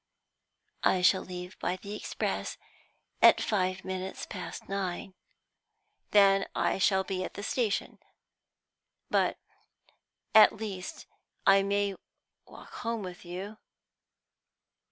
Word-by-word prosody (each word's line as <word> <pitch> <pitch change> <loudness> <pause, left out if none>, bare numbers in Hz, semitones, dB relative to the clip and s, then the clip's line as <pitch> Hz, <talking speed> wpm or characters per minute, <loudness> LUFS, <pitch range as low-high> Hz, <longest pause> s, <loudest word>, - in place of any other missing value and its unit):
I 180 - +2
shall 190 +1 +5
leave 180 0 -8
by 180 - -1
the 200 +2 -7
express - - -3 0.6
at - - +8
five 185 -2 -1
minutes 190 0 -4
past 185 -4 -7
nine." 195 -1 -3 1.0
"Then 195 -1 +5
I - - +1
shall 190 0 +3
be 185 0 -3
at - - -7
the 205 - -6
station. 220 -2 -1 1.1
But - - +2 1.0
at 215 - +8
least 200 -4 -6 0.4
I 195 0 +7
may 200 0 0 0.5
walk - - -13
home 230 -3 -3
with 180 -1 -8
you?" 190 +5 -7
195 Hz, 110 wpm, -30 LUFS, 185-205 Hz, 1.1 s, at